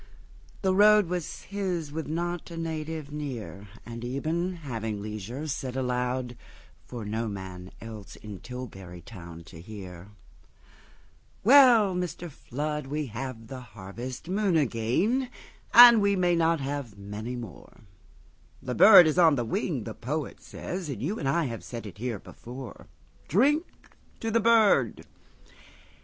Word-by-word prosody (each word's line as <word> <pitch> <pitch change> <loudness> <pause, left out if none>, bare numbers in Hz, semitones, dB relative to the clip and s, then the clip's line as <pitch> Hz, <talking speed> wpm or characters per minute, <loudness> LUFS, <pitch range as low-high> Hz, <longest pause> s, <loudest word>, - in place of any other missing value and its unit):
The 190 -1 +3
road 210 -1 +6
was 175 -3 -4
his 185 -6 -3
with 160 +1 -4
not 175 +3 -3
a 170 - -8
native 160 -2 -4
near; 125 -9 -6 0.2
And 115 0 -7
Eben, 160 +8 -2
having 115 -9 -4
leisure, 110 +7 -6
said 130 -3 -4
aloud, 125 -1 -1 0.5
For 120 -4 -7
no 110 +2 -2
man 95 -3 -7
else 110 -3 -9
in 105 -3 -9
Tilbury 95 -7 -8
Town 85 -4 -11
to 80 0 -12
hear:"Well, 105 - 0
Mr. 175 -1 -4
Flood, 150 +2 -4
we 150 +2 -2
have 125 -2 -5
the 130 +3 -8
harvest 115 +4 -8
moonAgain, 185 - +1 0.4
and 235 -2 +10
we 200 0 +3
may 180 -2 +2
not 165 -1 +2
have 135 -6 -4
many 105 +5 -6
more; 115 -6 -10 0.8
The 130 -1 -4
bird 180 - +9
is 155 +3 +1
on 165 -4 +6
the 120 -3 -1
wing, 155 - -2
the 110 - -6
poet 145 +7 -4
says, 180 -3 -6
And 130 -7 -4
you 170 - -2
and 135 - -1
I 170 +4 +2
have 115 -3 -5
said 115 -2 -7
it 100 -1 -10
here 120 -2 -2
before. 125 +4 -10 0.4
Drink 290 - +3 0.5
to 225 - -2
the 230 - +3
bird." 215 - +3
135 Hz, 140 wpm, -27 LUFS, 110-175 Hz, 0.8 s, and